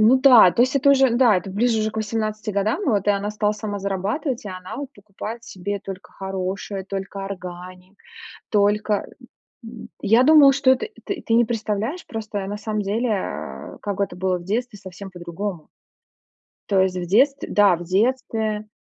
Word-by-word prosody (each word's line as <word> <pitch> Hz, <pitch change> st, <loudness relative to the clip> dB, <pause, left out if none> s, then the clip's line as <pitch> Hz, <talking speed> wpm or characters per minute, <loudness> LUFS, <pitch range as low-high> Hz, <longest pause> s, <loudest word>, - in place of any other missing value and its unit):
Ну 230 Hz, +5 st, +6 dB
да, 245 Hz, -10 st, +8 dB
то 235 Hz, -, +3 dB
есть 260 Hz, +2 st, +1 dB
это 280 Hz, +1 st, +4 dB
уже, 270 Hz, -2 st, +5 dB
да, 240 Hz, -6 st, +5 dB
это 190 Hz, +2 st, -4 dB
ближе 220 Hz, +3 st, +1 dB
уже 215 Hz, 0 st, 0 dB
к 220 Hz, -, -12 dB
18 215 Hz, 0 st, -2 dB
годам, 210 Hz, -, 0 dB
вот 205 Hz, -6 st, +1 dB
и -, -, +7 dB
она 200 Hz, +1 st, -1 dB
стала 210 Hz, 0 st, 0 dB
сама 210 Hz, -1 st, -5 dB
зарабатывать, 205 Hz, -, -2 dB
и 205 Hz, -, -5 dB
она 185 Hz, 0 st, -7 dB
вот 280 Hz, 0 st, -6 dB
покупает 210 Hz, +3 st, -8 dB
себе 200 Hz, -1 st, -5 dB
только 195 Hz, -1 st, -9 dB
хорошее, 190 Hz, 0 st, -4 dB
только 195 Hz, 0 st, -5 dB
органик, 185 Hz, 0 st, -9 dB, 0.5 s
только, 210 Hz, 0 st, +1 dB, 0.6 s
м 225 Hz, 0 st, -10 dB
я 225 Hz, +5 st, +4 dB
думала, 290 Hz, -2 st, +7 dB
что 270 Hz, -1 st, +4 dB
это 260 Hz, -, 0 dB, 0.2 s
ты 395 Hz, -, -5 dB
не 235 Hz, +1 st, +5 dB
представляешь, 225 Hz, -, -3 dB
просто 210 Hz, -3 st, -5 dB
на 205 Hz, -, -4 dB
самом 215 Hz, 0 st, -3 dB
деле, 225 Hz, +5 st, -1 dB
э, 205 Hz, -3 st, -4 dB
как 200 Hz, -1 st, -4 dB
это 195 Hz, -3 st, -1 dB
было 185 Hz, 0 st, 0 dB
в 175 Hz, -, -10 dB
детстве 220 Hz, +2 st, -3 dB
совсем 190 Hz, +1 st, -10 dB
по-другому. 175 Hz, 0 st, -6 dB, 1.0 s
То 195 Hz, -2 st, +3 dB
есть 185 Hz, -1 st, +1 dB
в 175 Hz, -1 st, -3 dB
детстве, 270 Hz, +9 st, +2 dB
да, 200 Hz, -4 st, +5 dB
в 175 Hz, -, -8 dB
детстве 215 Hz, +1 st, 0 dB
210 Hz, 180 wpm, -22 LUFS, 195-230 Hz, 1.0 s, да